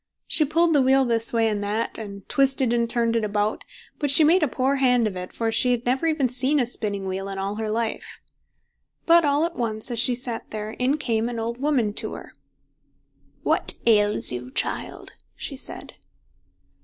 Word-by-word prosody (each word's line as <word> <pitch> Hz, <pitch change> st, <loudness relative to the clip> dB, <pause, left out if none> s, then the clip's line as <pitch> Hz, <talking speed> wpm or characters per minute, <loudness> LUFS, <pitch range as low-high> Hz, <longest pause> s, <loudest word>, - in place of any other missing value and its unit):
She 310 Hz, -, +4 dB
pulled 325 Hz, +3 st, +2 dB
the 285 Hz, -, +4 dB
wheel 265 Hz, +1 st, +3 dB
this 230 Hz, -1 st, -1 dB
way 230 Hz, -1 st, +1 dB
and 210 Hz, -2 st, -2 dB
that, 210 Hz, +3 st, -3 dB
and 200 Hz, -3 st, -9 dB
twisted 265 Hz, -3 st, +2 dB
and 235 Hz, -1 st, 0 dB
turned 235 Hz, -1 st, +1 dB
it 230 Hz, -, 0 dB
about, 210 Hz, 0 st, -2 dB, 0.4 s
but 290 Hz, -, -1 dB
she 280 Hz, +4 st, +6 dB
made 340 Hz, +5 st, +4 dB
a 305 Hz, -, +2 dB
poor 270 Hz, +2 st, -1 dB
hand 250 Hz, -3 st, +2 dB
of 200 Hz, -, -5 dB
it, 180 Hz, 0 st, -7 dB
for 225 Hz, -1 st, -2 dB
she 250 Hz, +3 st, +1 dB
had 245 Hz, -1 st, -1 dB
never 260 Hz, +6 st, 0 dB
even 305 Hz, -5 st, +1 dB
seen 260 Hz, +4 st, +2 dB
a 250 Hz, -, +1 dB
spinning 205 Hz, -4 st, -3 dB
wheel 190 Hz, +1 st, -4 dB
in 195 Hz, -, -6 dB
her 205 Hz, +3 st, -3 dB
life. 225 Hz, +1 st, -4 dB, 0.9 s
But 335 Hz, -1 st, +5 dB
all 290 Hz, +2 st, +2 dB
at 340 Hz, -, -5 dB
once, 225 Hz, 0 st, -2 dB
as 235 Hz, -, -1 dB
she 245 Hz, +1 st, +3 dB
sat 240 Hz, -2 st, -4 dB
there, 215 Hz, 0 st, -6 dB
in 255 Hz, +6 st, -1 dB
came 230 Hz, -4 st, -1 dB
an 240 Hz, -, -6 dB
old 230 Hz, +2 st, -4 dB
woman 260 Hz, -7 st, 0 dB
to -, -, -6 dB
her. -, -, -11 dB, 1.1 s
"What -, -, +1 dB
ails 210 Hz, -2 st, +5 dB
you, 125 Hz, 0 st, -6 dB
child?" -, -, -2 dB, 0.2 s
she -, -, -6 dB
said. -, -, -8 dB
235 Hz, 195 wpm, -23 LUFS, 215-270 Hz, 1.1 s, she